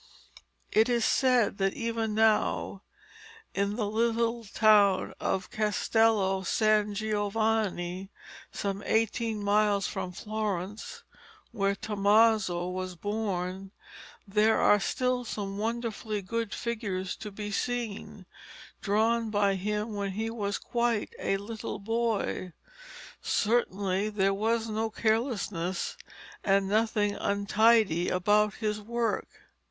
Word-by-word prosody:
It 220 Hz, +3 st, +4 dB
is 235 Hz, -2 st, +2 dB
said 250 Hz, -6 st, +2 dB
that 195 Hz, 0 st, +1 dB
even 225 Hz, -2 st, -2 dB
now, 220 Hz, -2 st, +2 dB, 0.7 s
in 200 Hz, +1 st, 0 dB
the 220 Hz, -2 st, -1 dB
little 230 Hz, +2 st, 0 dB
town 205 Hz, -2 st, +4 dB
of 190 Hz, -1 st, -2 dB
Castello 215 Hz, -3 st, +2 dB
San 210 Hz, +1 st, +2 dB
Giovanni, 205 Hz, -3 st, -1 dB, 0.4 s
some 200 Hz, 0 st, -3 dB
eighteen 225 Hz, -1 st, 0 dB
miles 205 Hz, -1 st, +2 dB
from 180 Hz, -, -4 dB
Florence, 210 Hz, 0 st, -4 dB, 0.5 s
where 200 Hz, -3 st, 0 dB
Tommaso 205 Hz, -3 st, +2 dB
was 185 Hz, 0 st, -4 dB
born, 195 Hz, -1 st, -3 dB, 0.6 s
there 210 Hz, +2 st, +3 dB
are 205 Hz, -, +5 dB
still 250 Hz, +4 st, 0 dB
some 200 Hz, -3 st, -5 dB
wonderfully 220 Hz, -2 st, -3 dB
good 230 Hz, +2 st, -3 dB
figures 205 Hz, -6 st, -3 dB
to 210 Hz, -, -7 dB
be 210 Hz, +1 st, -6 dB
seen, 220 Hz, -4 st, -3 dB, 0.6 s
drawn 225 Hz, +2 st, +1 dB
by 205 Hz, -2 st, +2 dB
him 210 Hz, +3 st, -2 dB
when 200 Hz, -1 st, -3 dB
he 220 Hz, +3 st, -2 dB
was 205 Hz, -3 st, -2 dB
quite 235 Hz, -3 st, -1 dB
a 195 Hz, -, 0 dB
little 215 Hz, +2 st, -6 dB
boy. 220 Hz, -4 st, -2 dB, 0.7 s
Certainly 205 Hz, -3 st, 0 dB
there 195 Hz, -2 st, +1 dB
was 225 Hz, +3 st, 0 dB
no 220 Hz, +1 st, -1 dB
carelessness 215 Hz, -6 st, -1 dB, 0.5 s
and 195 Hz, 0 st, +2 dB
nothing 210 Hz, 0 st, +1 dB
untidy 200 Hz, -3 st, +2 dB
about 210 Hz, +3 st, +2 dB
his 215 Hz, -1 st, -2 dB
work. 235 Hz, +2 st, -1 dB
210 Hz, 110 wpm, -29 LUFS, 195-225 Hz, 0.7 s, are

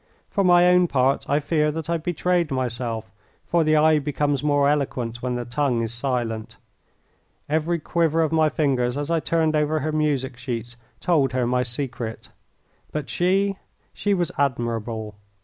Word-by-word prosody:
For 200 Hz, -, +1 dB
my 175 Hz, -1 st, +6 dB
own 180 Hz, 0 st, +5 dB
part 135 Hz, -2 st, +1 dB
I 145 Hz, +2 st, +3 dB
fear 150 Hz, 0 st, +1 dB
that 160 Hz, 0 st, -5 dB
I 170 Hz, 0 st, +1 dB
betrayed 175 Hz, 0 st, 0 dB
myself, 120 Hz, -4 st, -3 dB, 0.3 s
for 170 Hz, -1 st, +2 dB
the 155 Hz, 0 st, +3 dB
eye 155 Hz, 0 st, +5 dB
becomes 145 Hz, -1 st, -1 dB
more 145 Hz, -1 st, +2 dB
eloquent 125 Hz, -5 st, -1 dB
when 125 Hz, -1 st, -2 dB
the 120 Hz, 0 st, -3 dB
tongue 125 Hz, -1 st, 0 dB
is 115 Hz, 0 st, -4 dB
silent. 120 Hz, -3 st, -3 dB, 0.9 s
Every 160 Hz, +3 st, 0 dB
quiver 165 Hz, 0 st, +1 dB
of 155 Hz, -, -1 dB
my 160 Hz, -1 st, +3 dB
fingers 135 Hz, -4 st, 0 dB
as 145 Hz, +2 st, -3 dB
I 165 Hz, -, +3 dB
turned 160 Hz, -1 st, +1 dB
over 150 Hz, +1 st, +1 dB
her 155 Hz, +3 st, -1 dB
music 145 Hz, -4 st, 0 dB
sheets 120 Hz, -2 st, -5 dB, 0.3 s
told 145 Hz, -7 st, +2 dB
her 130 Hz, -1 st, +1 dB
my 125 Hz, +1 st, +1 dB
secret. 120 Hz, -2 st, -4 dB, 0.6 s
But 150 Hz, -2 st, -4 dB
she 195 Hz, +2 st, +1 dB, 0.4 s
she 205 Hz, -1 st, 0 dB
was 175 Hz, -3 st, -1 dB
admirable. 115 Hz, -5 st, -1 dB
145 Hz, 165 wpm, -23 LUFS, 125-160 Hz, 0.9 s, my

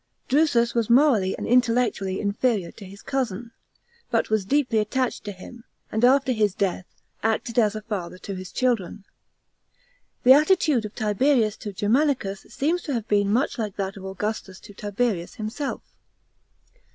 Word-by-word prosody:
Drusus 260 Hz, -5 st, +3 dB
was 235 Hz, -2 st, 0 dB
morally 235 Hz, -7 st, +4 dB
and -, -, -5 dB
intellectually 235 Hz, -6 st, +1 dB
inferior 205 Hz, -2 st, 0 dB
to 205 Hz, -, -12 dB
his 195 Hz, +2 st, -13 dB
cousin, 240 Hz, -4 st, -3 dB, 0.6 s
but -, -, 0 dB
was 215 Hz, -3 st, +1 dB
deeply 260 Hz, -2 st, +1 dB
attached 250 Hz, +4 st, -1 dB
to 205 Hz, -, -4 dB
him, 225 Hz, +5 st, -12 dB, 0.3 s
and 220 Hz, +2 st, -1 dB
after 265 Hz, +1 st, +4 dB
his 210 Hz, -5 st, +1 dB
death, 190 Hz, -2 st, -1 dB, 0.3 s
acted 225 Hz, +1 st, 0 dB
as 215 Hz, -2 st, +2 dB
a 215 Hz, -, -6 dB
father 190 Hz, -5 st, -5 dB
to 195 Hz, -, -7 dB
his 185 Hz, -1 st, -7 dB
children. 215 Hz, -6 st, -1 dB, 1.2 s
The 255 Hz, -, +9 dB
attitude 300 Hz, -, +3 dB
of 210 Hz, -, -8 dB
Tiberius 220 Hz, +1 st, +2 dB
to 210 Hz, -, -6 dB
Germanicus 210 Hz, 0 st, 0 dB
seems 330 Hz, +6 st, -1 dB
to 290 Hz, -, -4 dB
have 230 Hz, -2 st, -3 dB
been 205 Hz, -1 st, +2 dB
much 250 Hz, +3 st, 0 dB
like 210 Hz, -3 st, -3 dB
that 195 Hz, +1 st, -3 dB
of 195 Hz, -, -10 dB
Augustus 190 Hz, 0 st, -4 dB
to 205 Hz, -, -13 dB
Tiberius 205 Hz, -3 st, -2 dB
himself. 230 Hz, +7 st, -4 dB
220 Hz, 155 wpm, -24 LUFS, 200-250 Hz, 1.2 s, The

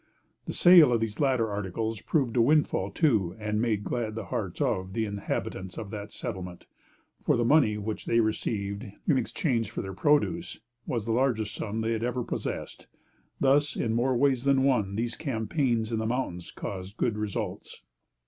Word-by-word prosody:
The -, -, -4 dB
sale 175 Hz, -6 st, +7 dB
of 120 Hz, -, +3 dB
these 110 Hz, -2 st, -3 dB
latter 130 Hz, -6 st, +2 dB
articles 105 Hz, +2 st, -3 dB
proved 130 Hz, -7 st, 0 dB
a 120 Hz, -, +5 dB
windfall 140 Hz, -7 st, +2 dB
to, 100 Hz, -, +1 dB
and 105 Hz, 0 st, -1 dB
made 110 Hz, -4 st, 0 dB
glad 115 Hz, -2 st, -2 dB
the 110 Hz, -3 st, -4 dB
hearts -, -, -4 dB
of 95 Hz, 0 st, -1 dB
the 110 Hz, +1 st, 0 dB
inhabitants 100 Hz, -2 st, -4 dB
of 100 Hz, -2 st, -6 dB
the 105 Hz, -1 st, -5 dB
settlement; 90 Hz, -3 st, -6 dB, 0.6 s
for -, -, +3 dB
the 120 Hz, -, +1 dB
money 120 Hz, -6 st, +4 dB
which 105 Hz, +1 st, -5 dB
they 115 Hz, -, +3 dB
received, 105 Hz, -2 st, -1 dB, 0.2 s
in 140 Hz, -5 st, +4 dB
exchange 115 Hz, -, -1 dB
for -, -, -4 dB
their 95 Hz, -1 st, -6 dB
produce, 150 Hz, -, +1 dB, 0.3 s
was 115 Hz, -4 st, -2 dB
the 115 Hz, -, -1 dB
largest 115 Hz, -3 st, +1 dB
sum 110 Hz, +1 st, -3 dB
they 110 Hz, +1 st, 0 dB
had 115 Hz, 0 st, -1 dB
ever 125 Hz, +1 st, -1 dB
possessed. -, -, -5 dB, 0.5 s
Thus, 145 Hz, +2 st, +3 dB
in 115 Hz, -, -1 dB
more 125 Hz, +2 st, +2 dB
ways 130 Hz, -1 st, +2 dB
than 135 Hz, -1 st, +3 dB
one, 110 Hz, -8 st, +2 dB
these 115 Hz, +2 st, -2 dB
campaigns 120 Hz, -3 st, -1 dB
in 115 Hz, -, 0 dB
the 110 Hz, -, -1 dB
mountains 110 Hz, -8 st, -3 dB
caused 95 Hz, +1 st, -7 dB
good 115 Hz, -, +1 dB
results. 105 Hz, -2 st, -4 dB
115 Hz, 175 wpm, -28 LUFS, 105-130 Hz, 0.6 s, sale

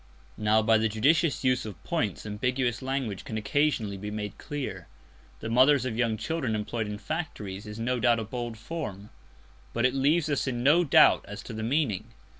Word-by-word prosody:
Now 110 Hz, +1 st, +3 dB
by 110 Hz, +1 st, +4 dB
the 110 Hz, 0 st, +1 dB
judicious 145 Hz, +10 st, +2 dB
use 130 Hz, -1 st, +2 dB
of 100 Hz, -7 st, -9 dB
points -, -, -2 dB
ambiguous 120 Hz, +3 st, -1 dB
language 130 Hz, -7 st, -3 dB
can 110 Hz, -, -5 dB
occasionally 110 Hz, -3 st, 0 dB
be 105 Hz, +2 st, -6 dB
made 105 Hz, -1 st, -5 dB
clear. 145 Hz, -3 st, -5 dB, 0.5 s
"The -, -, -4 dB
mothers 130 Hz, +2 st, +5 dB
of 125 Hz, -4 st, -2 dB
young 115 Hz, -2 st, +1 dB
children 130 Hz, -1 st, -2 dB
employed 110 Hz, +1 st, -3 dB
in 105 Hz, 0 st, -4 dB
factories" 105 Hz, -, -5 dB
is 105 Hz, 0 st, -7 dB
no 125 Hz, +2 st, -1 dB
doubt 120 Hz, 0 st, +4 dB
a -, -, -2 dB
bold 120 Hz, +1 st, -5 dB
form, 110 Hz, -, -6 dB, 0.6 s
but 120 Hz, +1 st, +1 dB
it 125 Hz, -, +3 dB
leaves 145 Hz, +4 st, +2 dB
us 145 Hz, -2 st, 0 dB
in 120 Hz, -2 st, -2 dB
no 155 Hz, +6 st, +5 dB
doubt 150 Hz, -, +6 dB
as -, -, -8 dB
to -, -, -8 dB
the 110 Hz, -, -5 dB
meaning. 120 Hz, -4 st, -1 dB
120 Hz, 190 wpm, -28 LUFS, 110-135 Hz, 0.6 s, doubt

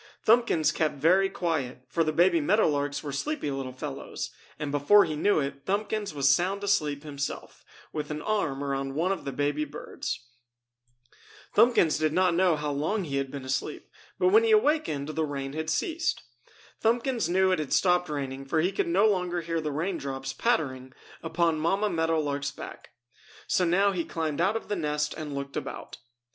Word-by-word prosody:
Thumbkins 225 Hz, -9 st, +4 dB
kept 155 Hz, -2 st, 0 dB
very 180 Hz, +7 st, +3 dB
quiet, 145 Hz, -9 st, -2 dB
for 165 Hz, +7 st, +1 dB
the 155 Hz, -, 0 dB
baby 170 Hz, +1 st, +4 dB
meadow 210 Hz, +9 st, +3 dB
larks 145 Hz, -1 st, -1 dB
were 145 Hz, -, -4 dB
sleepy 215 Hz, -, -2 dB
little 135 Hz, -1 st, -4 dB
fellows, 135 Hz, +1 st, -6 dB, 0.3 s
and 145 Hz, -2 st, -4 dB
before 145 Hz, +9 st, +5 dB
he 155 Hz, -, -3 dB
knew 200 Hz, +4 st, +2 dB
it 140 Hz, -1 st, -4 dB
Thumbkins 210 Hz, +1 st, -1 dB
was 140 Hz, -2 st, 0 dB
sound 185 Hz, +8 st, +2 dB
asleep 150 Hz, -8 st, +1 dB
himself, 145 Hz, -2 st, -6 dB, 0.3 s
with 150 Hz, -1 st, -4 dB
an 150 Hz, 0 st, -3 dB
arm 155 Hz, -8 st, -1 dB
around 135 Hz, -1 st, -2 dB
one 170 Hz, +5 st, +1 dB
of 195 Hz, -, -3 dB
the 140 Hz, -, -2 dB
baby 145 Hz, +2 st, 0 dB
birds. 140 Hz, -4 st, -6 dB, 1.3 s
Thumbkins 230 Hz, -11 st, +4 dB
did 155 Hz, -1 st, +1 dB
not 180 Hz, 0 st, +3 dB
know 175 Hz, -1 st, +3 dB
how 150 Hz, -1 st, -2 dB
long 160 Hz, +9 st, -1 dB
he 140 Hz, -5 st, -3 dB
had 135 Hz, -1 st, -1 dB
been 135 Hz, -1 st, -7 dB
asleep, 130 Hz, +1 st, -3 dB, 0.3 s
but 370 Hz, -, +3 dB
when 435 Hz, +4 st, +6 dB
he 455 Hz, -, +2 dB
awakened 300 Hz, -, +2 dB
the 160 Hz, +1 st, -1 dB
rain 140 Hz, -2 st, -4 dB
had 160 Hz, +1 st, -3 dB
ceased. 330 Hz, -, -1 dB, 0.6 s
Thumbkins 235 Hz, -3 st, +1 dB
knew 190 Hz, +1 st, +3 dB
it 185 Hz, -, +1 dB
had 150 Hz, -3 st, -4 dB
stopped 180 Hz, -2 st, +3 dB
raining 135 Hz, -2 st, -4 dB
for 160 Hz, +4 st, 0 dB
he 175 Hz, +4 st, +2 dB
could 195 Hz, -, -1 dB
no 185 Hz, +5 st, +3 dB
longer 180 Hz, -4 st, +1 dB
hear 165 Hz, 0 st, -2 dB
the 155 Hz, -1 st, -3 dB
rain 170 Hz, +5 st, -2 dB
drops 135 Hz, -1 st, -4 dB
pattering 130 Hz, -, -1 dB, 0.3 s
upon 165 Hz, -1 st, +1 dB
Mamma 195 Hz, +6 st, +1 dB
Meadow 165 Hz, -1 st, +1 dB
Lark's 145 Hz, -1 st, -1 dB
back. -, -, -10 dB, 0.6 s
So 180 Hz, -, +2 dB
now 195 Hz, +4 st, +3 dB
he 180 Hz, -3 st, -1 dB
climbed 160 Hz, -2 st, -2 dB
out 195 Hz, +5 st, +2 dB
of -, -, -9 dB
the 205 Hz, -, -1 dB
nest 150 Hz, -3 st, -1 dB
and 150 Hz, -3 st, -6 dB
looked 140 Hz, 0 st, -5 dB
about. -, -, -6 dB
155 Hz, 185 wpm, -27 LUFS, 140-190 Hz, 1.3 s, when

